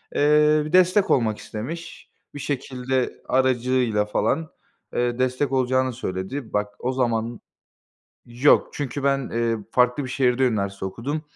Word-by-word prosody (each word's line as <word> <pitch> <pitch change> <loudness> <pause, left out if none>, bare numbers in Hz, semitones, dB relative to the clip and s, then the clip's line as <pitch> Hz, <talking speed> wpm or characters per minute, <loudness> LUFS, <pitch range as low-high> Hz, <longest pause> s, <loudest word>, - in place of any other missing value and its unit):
Eee, 150 +1 +4
bir 155 - -7
destek 185 +2 +4
olmak 110 -4 +2
istemiş. 145 +11 -7 0.3
Bir - - -6
şekilde 130 -2 -2
aracıyla 125 -4 +2
falan, 110 +9 -1 0.4
eee, 120 0 -1
destek 130 +2 0
olacağını 130 0 +1
söyledi. 115 +3 -5
Bak, 105 0 -1
o 130 +1 -2
zaman 120 -2 -1 0.9
Yok, 120 +5 +3
çünkü 145 -1 -4
ben, 140 -2 +1
eee, 115 0 0
farklı 125 +2 +2
bir 130 - -6
şehirde 130 0 +2
üniversite 100 -4 -2
okudum. 130 +11 -4
130 Hz, 130 wpm, -23 LUFS, 115-140 Hz, 0.9 s, Eee